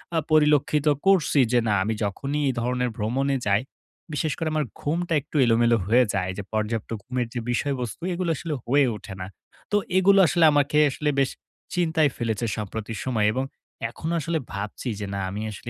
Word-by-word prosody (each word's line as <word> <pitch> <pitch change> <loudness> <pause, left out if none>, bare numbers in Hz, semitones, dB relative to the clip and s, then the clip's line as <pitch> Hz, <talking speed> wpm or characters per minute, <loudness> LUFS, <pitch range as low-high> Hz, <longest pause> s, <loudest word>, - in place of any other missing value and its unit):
আ - - +3
পরিলক্ষিত 150 -1 +3 0.2
করছি 190 -6 +4
যে 125 - +4
না, 105 - +2
আমি 110 +3 -1
যখনই 140 +9 -2
এই 130 - +1
ধরনের 125 +1 0
ভ্রমণে 135 +6 0
যাই, 100 +1 +3 0.5
বিশেষ 150 +1 0
করে 165 - -2
আমার 155 -2 +1 0.2
ঘুমটা 170 +3 -1
একটু 150 - -18
এলোমেলো 115 0 +4
হয়ে 125 +3 +5
যায়। 90 -2 -1
যে 100 - -4
পর্যাপ্ত 110 0 -2
ঘুমের 125 -2 -2
যে 120 - -2
বিষয়বস্তু, 125 -1 -2
এগুলো 175 0 -2
আসলে 155 +1 -4
হয়ে 140 +3 +4
ওঠে 100 -1 -9
না। 90 - -4 0.4
তো 205 - +4 0.2
এগুলো 195 +1 +5
আসলে 170 -1 +4
আমাকে 145 0 +2
আসলে 150 +2 -2
বেশ 135 - +3 0.5
চিন্তায় 160 -4 +2
ফেলেছে 115 -1 -1
সম্প্রতি 110 +1 -5
সময়। 110 -5 +1
এবং 130 +2 -1 0.5
এখনো 160 +8 -4
আসলে 165 +2 -1
ভাবছি 105 +5 -4
যে 105 - -3
না, 100 - -2
আমি 100 +3 -5
আসলে 115 - -8
130 Hz, 180 wpm, -25 LUFS, 110-150 Hz, 0.5 s, হয়ে